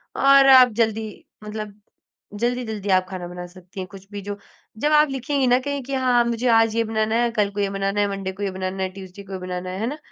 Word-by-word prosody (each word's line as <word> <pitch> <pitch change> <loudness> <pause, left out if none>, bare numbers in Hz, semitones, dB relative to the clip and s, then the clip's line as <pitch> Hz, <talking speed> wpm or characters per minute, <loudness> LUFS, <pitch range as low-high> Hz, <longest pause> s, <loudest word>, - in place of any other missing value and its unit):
और 275 0 +6
आप 255 -1 +9
जल्दी, 220 -1 -2 0.2
मतलब 210 -1 -6 0.6
जल्दी-जल्दी 220 -2 -2
आप 185 -1 +3
खाना 185 -2 -6
बना 180 0 -7
सकती 185 +1 -13
हैं। 185 - -4
कुछ 195 0 -13
भी, 205 - -6
जो 205 +1 -6 0.4
जब 295 +7 0
आप 300 0 +5
लिखेंगी 270 0 -1
ना 250 +1 +4
कहीं 285 +1 -3
कि 275 +2 -6
हाँ, 250 -2 +3
मुझे 235 +1 -1
आज 225 -1 +4
ये 230 - +2
बनाना 220 0 -1
है, 240 0 +2
कल 210 -3 +1
को 205 - -6
ये 200 -1 +1
बनाना 195 +1 -2
है, 205 - +2
मंडे 195 -1 -4
को 195 +2 -7
ये 195 - -1
बनाना 185 0 -4
है, 190 - -1
ट्यूज़डे 190 +1 -11
को 195 0 -10
ये 190 - -4
बनाना 180 0 -5
है। 185 +1 -5
है 225 - -1
ना? 295 - -4
210 Hz, 250 wpm, -22 LUFS, 190-240 Hz, 0.6 s, आप